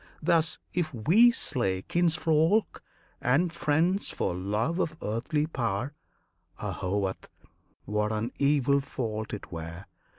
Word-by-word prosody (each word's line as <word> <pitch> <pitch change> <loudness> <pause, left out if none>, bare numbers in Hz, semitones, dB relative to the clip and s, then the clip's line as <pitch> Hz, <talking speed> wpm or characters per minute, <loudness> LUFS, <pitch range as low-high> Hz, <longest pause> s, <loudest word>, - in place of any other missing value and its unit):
Thus, 165 0 +2 0.2
if 170 -3 0
we 175 - +6
slay 110 - -1
Kinsfolk 165 +3 +2 0.4
and 160 +8 +2
friends 170 +5 +1
for - - -1
love 105 - -1
of 155 -3 -1
earthly 125 +8 -1
power, 120 -3 -2 0.7
Ahovat! 95 0 -2 0.6
what 105 +1 0
an 110 +3 -2
evil 140 -1 +3
fault 110 -6 -4
it 105 - -7
were! 85 +2 -7
135 Hz, 110 wpm, -28 LUFS, 105-160 Hz, 0.7 s, we